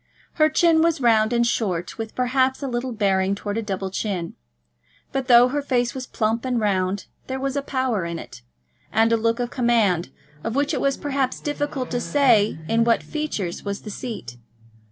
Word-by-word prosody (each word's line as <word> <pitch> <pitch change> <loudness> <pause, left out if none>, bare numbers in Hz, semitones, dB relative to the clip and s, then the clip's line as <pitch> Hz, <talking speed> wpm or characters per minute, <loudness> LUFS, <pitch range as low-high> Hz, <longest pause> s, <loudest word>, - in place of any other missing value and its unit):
Her 310 - +6
chin 325 0 +4
was 330 -1 +2
round 225 -3 +3
and 235 0 +2
short, 185 -6 -1
with, 225 -1 -5
perhaps, 260 +2 +1
a - - -1
little 250 0 -2
bearing 195 -3 +1
towards 205 +1 -3
a - - -1
double 195 -2 -4
chin. 185 -4 -3 0.8
But 270 -1 -2
though 245 0 +7
her 290 +2 -1
face 245 -3 0
was 260 -2 -6
plump 225 +1 -1
and 250 -2 0
round, 195 -2 0 0.2
there 265 0 -3
was 275 0 -2
a 280 - 0
power 260 -8 -1
in 170 0 -4
it, - - -10 0.5
and 225 +1 +3
a - - +6
look 230 +1 0
of 245 0 -2
command, 225 -9 +2 0.3
of 225 - -3
which 285 +1 +1
it - - -1
was, 275 -1 +1
perhaps, 275 -3 -1
difficult 290 -3 -3
to 245 0 -1
say 240 - +3
in 230 0 +3
what 230 0 +2
features 295 - -4
was 200 -1 -4
the 210 - -7
seat. 200 - -7
235 Hz, 195 wpm, -23 LUFS, 205-265 Hz, 0.8 s, though